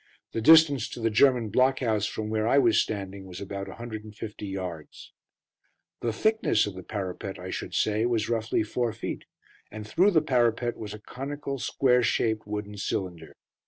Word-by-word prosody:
The 115 - -2
distance 150 -3 +6
to - - -8
the 115 -1 0
German 120 0 +4
block 130 +4 +3
house 110 -4 +1
from 110 0 -4
where 110 0 0
I 135 - +4
was 120 -5 +5
standing 100 -2 -5
was 90 0 -8
about 100 0 -5
150 110 -1 -7
yards. 90 -5 -7 0.9
The 115 - -1
thickness 220 - +2
of 105 - -5
the 95 - -8
parapet, 95 0 -5
I 90 +1 -7
should - - -5
say, 110 +2 +2
was 115 -3 0
roughly 110 -1 0
four 115 +1 -1
feet; 115 - -5 0.4
and 105 0 -8
through 185 - +4
the 160 -6 +3
parapet 120 -3 +1
was 105 -1 -7
a - - -11
conical, 140 +4 -5
square 125 0 +2
shaped, 110 -2 0
wooden 105 0 -5
cylinder. 85 -6 -4
110 Hz, 170 wpm, -27 LUFS, 100-125 Hz, 0.9 s, distance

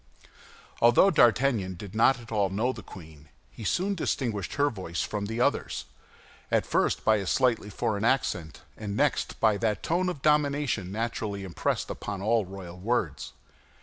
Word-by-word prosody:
Although 120 +12 +6
D'Artagnan 120 - +3
did 95 +2 -9
not 120 +4 +4
at 115 -1 -13
all 100 -3 +1
know 115 +7 0
the - - -9
queen, 80 -4 -13 0.2
he 115 - -10
soon 185 - 0
distinguished 115 - -2
her 145 0 +2
voice 90 -5 -4
from 105 -1 -3
the 115 +2 -4
others, - - 0 0.6
at - - +2
first - - 0
by 110 -1 +5
a 100 -2 -4
slightly 120 -4 +1
foreign 105 +1 -2
accent, 100 - 0
and 105 -1 -5
next 145 -1 0
by 110 -2 +3
that 110 -1 -1
tone 180 +3 +1
of 150 -7 -6
domination 145 -10 +1
naturally 110 -2 -3
impressed 90 -4 -2
upon 100 -2 -5
all 110 0 +1
royal 90 -2 -9
words. 100 -7 -2
110 Hz, 160 wpm, -28 LUFS, 95-130 Hz, 0.6 s, Although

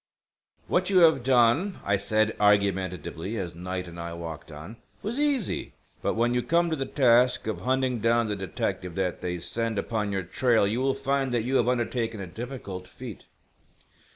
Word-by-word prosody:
"What - - +1
you 195 - +3
have 160 -5 +6
done," 130 - +3
I 100 - +3
said, 110 +2 +1
argumentatively, 95 -2 +1
as 90 -5 -4
Knight 90 +1 -4
and 85 0 -9
I 85 0 -5
walked 80 -2 -7
on, 80 +10 -9 0.3
"was 235 +6 -2
easy. 285 - 0 0.3
But - - 0
when 120 +2 +2
you 125 - +1
come 170 +7 +2
to - - +1
the 135 -3 -3
task 125 -2 +4
of 110 - -3
hunting 130 -1 0
down 115 +1 +3
the 105 -1 -2
detective 95 -2 -3
that 95 -2 -2
they 90 -1 -2
send 115 +5 -2
upon 105 -1 -1
your 95 -1 -1
trail 115 +5 +2
you 110 +5 0
will 135 0 +1
find 135 -1 0
that 115 - +1
you 130 +3 +1
have 120 - +2
undertaken 120 -2 -1
a 100 - -4
difficult 100 -3 -7
feat." 120 +1 -10
115 Hz, 180 wpm, -27 LUFS, 95-130 Hz, 0.3 s, have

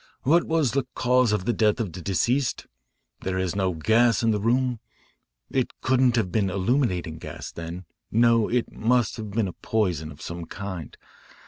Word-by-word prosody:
What 170 +6 +4
was 160 -6 +1
the 135 -2 -1
cause 125 -2 +3
of 105 -3 0
the 120 - +1
death 105 -2 +2
of 100 -8 -3
the 90 - -7
deceased? 120 - 0 0.5
There 95 0 -3
is 95 -1 -1
no 95 -3 0
gas 115 +8 +3
in 115 - +3
the 105 - +1
room. 125 +1 +1 0.7
It 130 -2 0
couldn't 130 -1 +3
have 105 -7 0
been 100 0 +1
illuminating 95 - 0
gas, - - -7
then. 85 +2 -7 0.3
No, 115 -1 +4
it 120 0 0
must 120 0 +1
have 110 -2 -6
been 105 0 0
a 90 - -6
poison 90 -8 -1
of 70 - -13
some 85 0 -6
kind. 95 -5 -7
110 Hz, 180 wpm, -25 LUFS, 95-125 Hz, 0.7 s, What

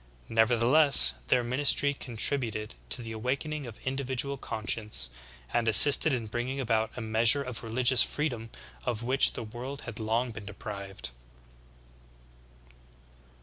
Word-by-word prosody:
Nevertheless 115 - +5
their 125 - +1
ministry 140 +3 +1
contributed 115 -3 0 0.2
to 125 - 0
the 115 - -9
awakening 135 +5 -5
of 115 - -12
individual 135 +1 -3
conscience, 105 - -2 0.4
and 120 -1 -1
assisted 145 +8 +8
in 120 -4 -3
bringing 120 +5 -5
about 110 -3 -2
a - - -6
measure 115 +5 +3
of 125 -3 -8
religious 120 +2 +2
freedom 120 -7 -3 0.3
of 115 - -5
which 130 +3 +3
the - - -7
world 120 +5 -9
had 115 -2 -10
long 115 +3 -2
been 110 -2 -11
deprived. 100 - -8
120 Hz, 125 wpm, -27 LUFS, 110-135 Hz, 0.4 s, assisted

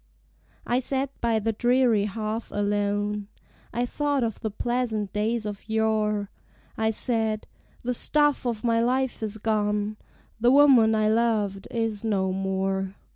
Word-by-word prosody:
I 245 - +1
sat 265 +1 0
by 230 -1 +2
the 220 +1 0
dreary 240 -2 +3
hearth 215 +2 -4
alone: 205 0 -1 0.4
I 240 +2 -1
thought 285 +1 0
of 225 -2 -2
the 220 - -2
pleasant 225 -2 -2
days 215 +2 -1
of 210 +1 -7
yore: 215 -2 0 0.4
I 220 0 +1
said, 220 -1 -1 0.4
"The 250 +1 -1
staff 295 +1 +2
of 230 -2 -3
my 230 -1 +2
life 255 +1 0
is 220 -1 -3
gone: 210 -1 -1 0.4
The 240 +2 +4
woman 255 -5 +6
I 215 0 +2
loved 215 -3 +1
is 225 -3 -2
no 195 -4 0
more. 190 0 -2
220 Hz, 140 wpm, -26 LUFS, 205-240 Hz, 0.4 s, woman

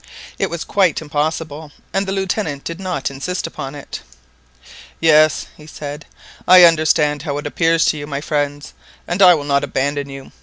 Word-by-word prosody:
It - - 0
was 170 -2 -4
quite 190 -6 +1
impossible, 155 0 -3 0.2
and 195 0 0
the - - -2
Lieutenant 190 -6 -2
did 165 +1 -6
not 185 -6 -3
insist 140 +7 -4
upon 135 -1 -7
it. 145 - -8 1.0
"Yes," 155 -2 +4
he 150 - -15
said, 150 -1 -8 0.4
"I 180 0 +9
understand 155 -3 +3
how 145 -2 -3
it 145 - -6
appears 165 +2 +2
to 155 - +1
you, 145 0 -6
my 140 -2 -3
friends, 145 -1 -3 0.3
and 175 +3 -2
I 180 -2 +8
will 150 - -4
not 140 0 +1
abandon 140 +1 -2
you. 135 -1 -10
150 Hz, 175 wpm, -18 LUFS, 145-170 Hz, 1.0 s, I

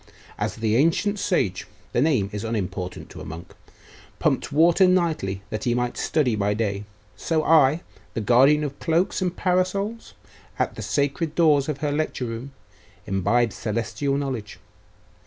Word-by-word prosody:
As - - -2
the 110 0 +1
ancient 180 +8 +2
sage 100 - 0 0.3
the 120 - +2
name 130 -10 +2
is 105 0 -4
unimportant 95 -5 -4
to - - -9
a - - -7
monk 80 +2 -9 0.6
pumped - - 0
water 170 +5 +5
nightly 160 - 0
that 110 -1 -3
he 120 -1 +2
might 125 0 -1
study 135 -8 +1
by 105 0 0
day, 105 -2 -2 0.3
so 160 -2 0
I, 155 0 +4 0.3
the - - 0
guardian 135 +7 +5
of 140 -1 -5
cloaks 170 +5 +1
and 180 -1 -1
parasols, 195 +5 -1 0.4
at - - 0
the - - -8
sacred 145 +3 -1
doors 150 -4 +4
of 150 -1 -3
her 150 -1 0
lecture 145 -3 -1
room, 115 +4 -6 0.5
imbibe 100 +5 +1
celestial 115 +5 -2
knowledge. 130 -7 -4
135 Hz, 155 wpm, -24 LUFS, 110-160 Hz, 0.6 s, water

